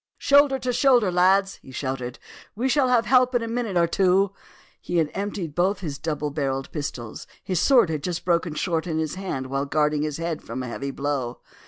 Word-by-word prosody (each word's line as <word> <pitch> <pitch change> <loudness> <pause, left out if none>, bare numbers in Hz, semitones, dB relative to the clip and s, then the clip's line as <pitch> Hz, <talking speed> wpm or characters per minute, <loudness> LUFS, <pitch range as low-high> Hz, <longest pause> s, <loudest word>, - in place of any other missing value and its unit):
"Shoulder 280 -1 +4
to 250 -1 -2
shoulder, 245 -5 +4
lads!" 190 +2 +3
he - - -15
shouted. 130 -1 -4 0.4
"We 240 +5 0
shall 265 0 +3
have 245 -2 +3
help 255 0 +4
in 240 - +2
a - - -3
minute 230 -5 -2
or 170 - +4
two." 190 +2 +2 0.5
He 175 - -2
had 160 -3 +1
emptied 195 -5 -4
both 185 +5 +1
his 145 -5 -5
double 150 -2 -3
barrelled 135 -2 -2
pistols. 125 -7 -6 0.2
His 185 -3 -1
sword 240 - +4
had 155 -2 -2
just 175 +2 -4
broken 170 -2 +1
short 165 +1 -1
in 160 -2 -2
his 160 -1 -2
hand 185 -9 -4
while 135 +2 -2
guarding 150 0 +1
his 150 -1 -2
head 165 -1 -3
from 130 - -6
a - - -5
heavy 140 +3 -4
blow. 135 -3 -3
170 Hz, 205 wpm, -24 LUFS, 145-205 Hz, 0.5 s, Shoulder